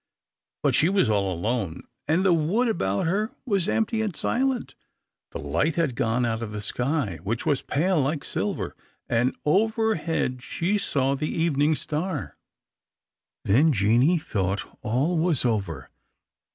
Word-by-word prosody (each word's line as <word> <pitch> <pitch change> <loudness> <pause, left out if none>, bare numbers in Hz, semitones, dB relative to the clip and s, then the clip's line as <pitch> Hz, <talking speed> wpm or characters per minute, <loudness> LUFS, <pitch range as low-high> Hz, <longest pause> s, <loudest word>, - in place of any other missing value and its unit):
But - - +3
she 160 - +4
was 190 - +2
all 100 -2 +1
alone, 95 -1 -2 0.2
and 170 +5 +2
the 185 - +5
wood 175 +10 +2
about 100 - 0
her 210 +9 -1
was 200 -5 +1
empty 225 0 +1
and 210 -6 -2
silent. 260 0 0 0.6
The - - -5
light 155 - 0
had 165 -6 +1
gone 115 +2 +1
out 115 -1 -1
of 110 -2 -4
the 105 - -4
sky, 125 - -1
which 110 +6 -3
was 145 - +1
pale 165 +3 +1
like 140 +1 -1
silver, - - -3 0.3
and 120 +3 +1
overhead 190 - +1
she 180 +9 -1
saw 135 -7 +1
the 150 +2 -2
evening 155 -2 +2
star. 155 +2 -3 1.1
Then 140 +11 +4
Jeanie 120 - +3
thought 100 - -2 0.2
all 140 +10 0
was 160 -6 +2
over. 95 - -2
150 Hz, 145 wpm, -25 LUFS, 115-180 Hz, 1.1 s, the